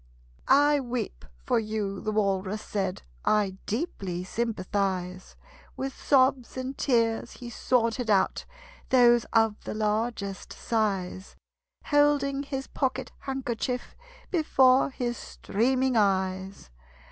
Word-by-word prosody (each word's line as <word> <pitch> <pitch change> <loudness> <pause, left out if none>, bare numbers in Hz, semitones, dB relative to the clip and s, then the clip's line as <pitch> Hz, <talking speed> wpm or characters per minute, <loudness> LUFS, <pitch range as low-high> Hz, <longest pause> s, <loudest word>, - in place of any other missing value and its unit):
"I 290 +1 +5
weep 240 - -4 0.2
for - - +2
you," 210 -3 -3
the 215 - -2
Walrus 200 -1 0
said: 190 -3 -3 0.2
"I 200 -3 +1
deeply 195 - -3
sympathize." 190 -3 -2 0.4
With 270 0 -4
sobs 260 -2 +2
and 260 +1 -4
tears 230 -5 +1
he 240 -1 -9
sorted 230 0 0
out 200 -2 +2 0.4
Those 240 -2 +5
of 225 -2 +2
the - - -5
largest 215 -2 -2
size, 195 -4 -2 0.5
Holding 290 -2 +3
his 270 -1 -4
pocket 265 -2 -2
handkerchief 250 -2 -3 0.4
Before 270 -7 +4
his 240 -3 -3
streaming 255 +4 0
eyes. 190 - 0
225 Hz, 105 wpm, -27 LUFS, 200-260 Hz, 0.5 s, I